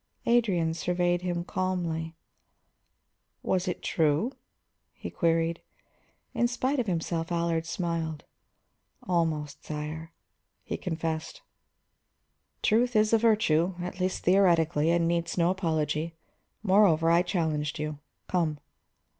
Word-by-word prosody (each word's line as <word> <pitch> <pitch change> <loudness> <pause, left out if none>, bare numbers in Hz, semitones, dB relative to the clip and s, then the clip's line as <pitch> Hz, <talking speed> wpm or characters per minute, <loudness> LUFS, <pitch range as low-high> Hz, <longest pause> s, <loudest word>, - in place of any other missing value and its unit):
Adrian 195 -9 +2
surveyed 175 +1 0
him 175 -1 -2
calmly. 170 -3 -2 1.3
"Was 185 0 0
it 180 - -3
true?" 160 - +1 0.6
he - - -8
queried. 165 0 +1 0.7
In 240 - +2
spite 255 +3 -1
of 240 - -1
himself 165 -1 -2
Allard 170 -1 0
smiled. 165 -3 -3 0.8
"Almost, 160 -4 -1
sire," 155 +2 -5 0.5
he - - -4
confessed. 160 -2 -4 1.2
"Truth 240 +2 +3
is 215 +1 +3
a 225 - +6
virtue, 190 -6 +3
at 180 +1 -5
least 185 0 -1
theoretically, 170 -4 +3
and 170 0 +3
needs 170 +1 -1
no 170 0 +3
apology. 160 -3 -1 0.5
Moreover, 185 -5 +4
I 170 +1 +5
challenged 160 -5 -1
you. 150 -1 -4 0.3
Come." 165 -4 0
170 Hz, 110 wpm, -28 LUFS, 160-185 Hz, 1.3 s, a